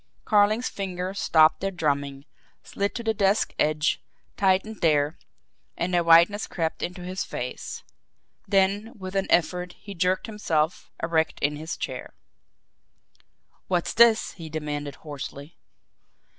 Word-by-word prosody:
Carling's 215 Hz, +3 st, +3 dB
fingers 190 Hz, 0 st, -4 dB
stopped 155 Hz, -1 st, +5 dB
their 195 Hz, -, -1 dB
drumming, 140 Hz, -5 st, -2 dB, 0.4 s
slid 200 Hz, 0 st, -3 dB
to 235 Hz, -, -4 dB
the 225 Hz, -1 st, +1 dB
desk 200 Hz, 0 st, +2 dB
edge, 155 Hz, 0 st, +1 dB, 0.3 s
tightened 195 Hz, +2 st, +1 dB
there, 150 Hz, -1 st, +2 dB, 0.6 s
and 180 Hz, +2 st, -2 dB
a 175 Hz, -, +3 dB
whiteness 170 Hz, +5 st, +5 dB
crept 165 Hz, -2 st, -3 dB
into 180 Hz, 0 st, -4 dB
his 185 Hz, +1 st, -3 dB
face. -, -, -6 dB, 0.6 s
Then, 200 Hz, +3 st, +2 dB
with 190 Hz, -1 st, -7 dB
an 195 Hz, 0 st, +1 dB
effort, 180 Hz, +1 st, +1 dB
he 200 Hz, -, -10 dB
jerked 180 Hz, +3 st, 0 dB
himself 170 Hz, -8 st, -1 dB
erect 160 Hz, -1 st, +1 dB
in 145 Hz, +1 st, +1 dB
his 160 Hz, +3 st, -5 dB
chair. -, -, -6 dB, 1.5 s
"What's 175 Hz, -2 st, 0 dB
this?" 230 Hz, -1 st, +5 dB
he 165 Hz, -3 st, -9 dB
demanded 145 Hz, -2 st, -4 dB
hoarsely. 145 Hz, +1 st, -8 dB
180 Hz, 130 wpm, -25 LUFS, 155-200 Hz, 1.5 s, stopped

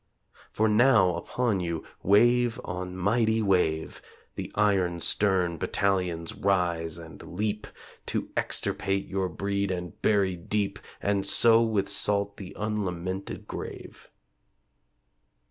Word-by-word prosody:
For 110 Hz, -, +1 dB
now 105 Hz, -4 st, +5 dB
upon 105 Hz, +5 st, -1 dB
you, 85 Hz, -2 st, -3 dB, 0.2 s
wave 120 Hz, +4 st, +4 dB
on 90 Hz, +1 st, -5 dB
mighty 110 Hz, +4 st, +2 dB
wave, 90 Hz, -5 st, 0 dB, 0.3 s
The -, -, -6 dB
iron 95 Hz, -5 st, +2 dB
stern 90 Hz, -3 st, +2 dB
battalions 90 Hz, -4 st, -1 dB
rise 85 Hz, -4 st, 0 dB
and 80 Hz, -1 st, -11 dB
leap 105 Hz, +3 st, -3 dB, 0.4 s
To -, -, -3 dB
extirpate 95 Hz, 0 st, -1 dB
your 95 Hz, -1 st, -1 dB
breed 100 Hz, +3 st, -2 dB
and 90 Hz, -3 st, -5 dB
bury 100 Hz, -3 st, +2 dB
deep 100 Hz, +3 st, -2 dB, 0.2 s
And 100 Hz, -1 st, +1 dB
sow 115 Hz, +3 st, +5 dB
with 110 Hz, -4 st, +1 dB
salt 100 Hz, 0 st, 0 dB
the 95 Hz, -3 st, -9 dB
unlamented 95 Hz, -3 st, -3 dB
grave! -, -, -8 dB
100 Hz, 110 wpm, -27 LUFS, 90-105 Hz, 0.4 s, now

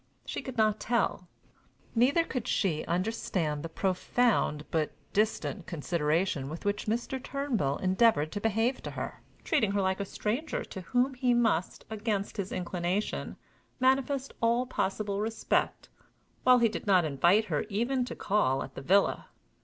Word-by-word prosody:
She -, -, -4 dB
could 260 Hz, -2 st, -8 dB
not 215 Hz, -1 st, +3 dB
tell. 230 Hz, -6 st, 0 dB, 0.7 s
Neither 265 Hz, +8 st, +4 dB
could 255 Hz, -6 st, -4 dB
she 170 Hz, -11 st, +1 dB
understand 175 Hz, -4 st, -1 dB
the 165 Hz, -, -5 dB
profound 185 Hz, -3 st, +1 dB
but 155 Hz, -2 st, 0 dB, 0.2 s
distant 215 Hz, -3 st, 0 dB
consideration 160 Hz, -2 st, 0 dB
with 160 Hz, +5 st, -7 dB
which 205 Hz, +1 st, -1 dB
Mr. 240 Hz, +4 st, -2 dB
Turnbull 240 Hz, -, -1 dB
endeavored 185 Hz, -5 st, +3 dB
to 205 Hz, -, -4 dB
behave 225 Hz, +4 st, +1 dB
to -, -, -5 dB
her, -, -, -6 dB, 0.2 s
treating 225 Hz, -11 st, +1 dB
her 200 Hz, -, +1 dB
like 190 Hz, +1 st, 0 dB
a 200 Hz, -, -2 dB
stranger 230 Hz, +10 st, -2 dB
to 190 Hz, -, -8 dB
whom 250 Hz, +8 st, +1 dB
he 250 Hz, -1 st, +2 dB
must, 225 Hz, -8 st, +1 dB
against 210 Hz, -2 st, -2 dB
his 195 Hz, -2 st, -3 dB
inclination, 180 Hz, +3 st, -2 dB, 0.4 s
manifest 265 Hz, +1 st, +1 dB
all 235 Hz, +2 st, +2 dB
possible 200 Hz, -4 st, -2 dB
respect, 225 Hz, +1 st, -1 dB, 0.6 s
while 255 Hz, 0 st, +7 dB
he 235 Hz, -1 st, +4 dB
did 215 Hz, -, -5 dB
not 185 Hz, -4 st, +5 dB
invite 170 Hz, +9 st, +3 dB
her 150 Hz, -7 st, -1 dB
even 240 Hz, +5 st, 0 dB
to -, -, -6 dB
call 135 Hz, -10 st, +1 dB
at -, -, -10 dB
_the -, -, -7 dB
villa. 195 Hz, +8 st, +2 dB
210 Hz, 155 wpm, -29 LUFS, 180-240 Hz, 0.7 s, while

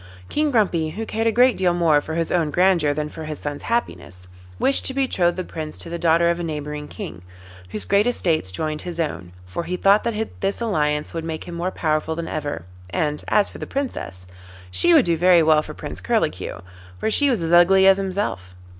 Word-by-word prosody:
King 300 Hz, 0 st, +1 dB
Grumpy, 185 Hz, -, +1 dB
who 220 Hz, +8 st, -5 dB
cared 225 Hz, +1 st, -1 dB
a -, -, +4 dB
great 245 Hz, +2 st, +4 dB
deal 180 Hz, -2 st, +1 dB
more 160 Hz, -4 st, +3 dB
for 160 Hz, +2 st, -6 dB
his 165 Hz, -1 st, -1 dB
own 165 Hz, -4 st, +1 dB
grandeur 175 Hz, -2 st, +3 dB
than 150 Hz, +1 st, -2 dB
for 155 Hz, +1 st, -8 dB
his 155 Hz, -1 st, -5 dB
son's 145 Hz, -1 st, -5 dB
happiness, 90 Hz, -, -3 dB, 0.3 s
wished 275 Hz, -, +3 dB
to 265 Hz, -, -3 dB
betroth 185 Hz, -11 st, +1 dB
the 185 Hz, -, -3 dB
Prince 155 Hz, -3 st, -7 dB
to 165 Hz, -, -7 dB
the 170 Hz, -, -4 dB
daughter 170 Hz, 0 st, +3 dB
of 170 Hz, -, -3 dB
a -, -, -3 dB
neighbouring 150 Hz, -2 st, -5 dB
King, 90 Hz, -, -8 dB, 0.5 s
whose 100 Hz, 0 st, -5 dB
great 200 Hz, -, +3 dB
estates 165 Hz, -, 0 dB
joined 155 Hz, +9 st, -3 dB
his 175 Hz, -2 st, -7 dB
own, 90 Hz, -, -3 dB
for 95 Hz, -, -5 dB
he 180 Hz, +2 st, -3 dB
thought 200 Hz, +3 st, +4 dB
that 220 Hz, -1 st, -4 dB
this 195 Hz, +1 st, -1 dB
alliance 150 Hz, -10 st, -1 dB
would 165 Hz, -1 st, -4 dB
make 160 Hz, -1 st, -5 dB
him 175 Hz, -, -9 dB
more 170 Hz, +2 st, -2 dB
powerful 160 Hz, -2 st, -1 dB
than 165 Hz, 0 st, -4 dB
ever, 145 Hz, -, -4 dB, 0.2 s
and 150 Hz, +8 st, -1 dB
as 210 Hz, -1 st, +3 dB
for -, -, -10 dB
the -, -, -6 dB
Princess 250 Hz, -, -5 dB, 0.5 s
she 90 Hz, -, +3 dB
would 170 Hz, -, +6 dB
do 170 Hz, -1 st, +2 dB
very 175 Hz, 0 st, +5 dB
well 155 Hz, -1 st, +4 dB
for -, -, -9 dB
Prince -, -, -7 dB
Curlicue, -, -, -1 dB, 0.4 s
for 220 Hz, -, -1 dB
she 285 Hz, +5 st, +5 dB
was 230 Hz, -10 st, 0 dB
as 165 Hz, -, -2 dB
ugly 185 Hz, +3 st, +6 dB
as 195 Hz, 0 st, +6 dB
himself. 185 Hz, -, -3 dB
170 Hz, 215 wpm, -22 LUFS, 150-195 Hz, 0.5 s, would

